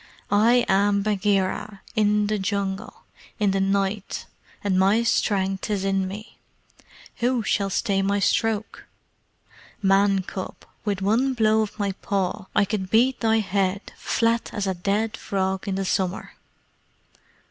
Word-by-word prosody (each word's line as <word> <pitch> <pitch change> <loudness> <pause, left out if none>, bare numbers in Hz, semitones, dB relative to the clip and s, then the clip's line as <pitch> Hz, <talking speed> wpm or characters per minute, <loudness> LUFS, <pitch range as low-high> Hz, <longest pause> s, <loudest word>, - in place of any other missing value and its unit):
"I 230 +4 +4
am 200 +1 +3
Bagheera 200 0 0
in 210 -1 +3
the 210 0 -1
jungle 195 +1 -3 0.4
in 205 -2 +3
the 195 - 0
night, 195 +1 -1 0.4
and 190 -2 +1
my 200 +5 +4
strength 195 -4 0
is 200 -2 -1
in 195 -1 +1
me. 210 +4 -9 0.8
Who 245 -1 +1
shall 200 -2 0
stay 195 0 0
my 200 +1 +1
stroke? 220 +2 0 0.9
Man 195 0 +3
cub, 190 0 -6 0.3
with 200 -3 -2
one 245 +7 +2
blow 220 -1 +3
of 215 -1 -4
my 200 -2 0
paw 195 -1 -2
I 205 - +4
could 190 -2 -3
beat 245 +5 +3
thy 225 -1 +2
head 195 0 -1
flat 230 0 0
as 205 - -1
a 190 - 0
dead 205 +5 -1
frog 190 -1 -2
in 195 - -1
the 195 0 -2
summer!" 185 0 -1
200 Hz, 140 wpm, -24 LUFS, 195-215 Hz, 0.9 s, I